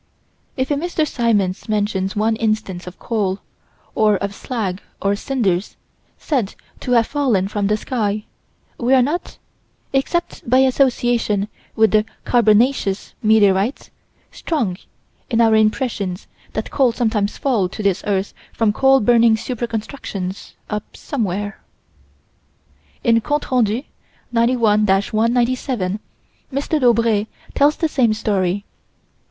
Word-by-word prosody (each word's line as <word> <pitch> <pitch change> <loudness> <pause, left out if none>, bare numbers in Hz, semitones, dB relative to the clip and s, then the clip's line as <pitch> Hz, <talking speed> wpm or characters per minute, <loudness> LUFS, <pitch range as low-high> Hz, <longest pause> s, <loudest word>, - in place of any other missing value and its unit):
If 260 +2 -1
a - - +4
Mr. 315 +1 -1
Symons 210 -7 0
mentions 205 -2 0
one 220 +2 +1
instance 215 -5 -2
of 180 - -9
coal, 205 -5 -1 0.6
or 215 -1 +3
of 200 +2 -3
slag 200 -5 -4 0.2
or 200 0 +1
cinders, 205 -6 -1 0.4
said 250 -10 -1 0.2
to 250 - -1
have 230 -1 +5
fallen 245 -10 +1
from 205 0 -1
the 210 +1 +2
sky, 215 -3 -2 0.5
we 255 +2 +3
are 255 - +5
not 310 +7 -3 0.6
except 275 0 -1
by 255 - +5
association 245 -6 +2 0.3
with 220 0 +4
the 215 -1 +4 0.2
"carbonaceous" 220 -3 +2
meteorites 210 +2 +2 0.4
strong 240 - -2 0.5
in 230 -3 +1
our 225 -1 +5
impression 215 -4 +1 0.4
that - - -4
coal 265 -4 +3
sometimes 220 -4 -1
falls 225 -10 +1
to 215 - -5
this 195 -2 +1
earth 195 -1 0 0.2
from 220 -2 +1
coal 270 +3 +4
burning 230 0 +5
super 240 +1 -3
constructions 210 -5 -5
up 210 0 -5
somewhere 205 -6 -3 1.4
In 230 -1 +4
Comptes 295 +6 -2
Rendus, 240 +1 +1 0.5
91 230 -3 +3
197, 230 +1 +1 0.6
M. 270 - -4
Daubrée 235 -8 +2 0.3
tells 290 +2 +4
the 325 - 0
same 245 -7 +2
story. 200 -2 0
220 Hz, 125 wpm, -20 LUFS, 205-250 Hz, 1.4 s, have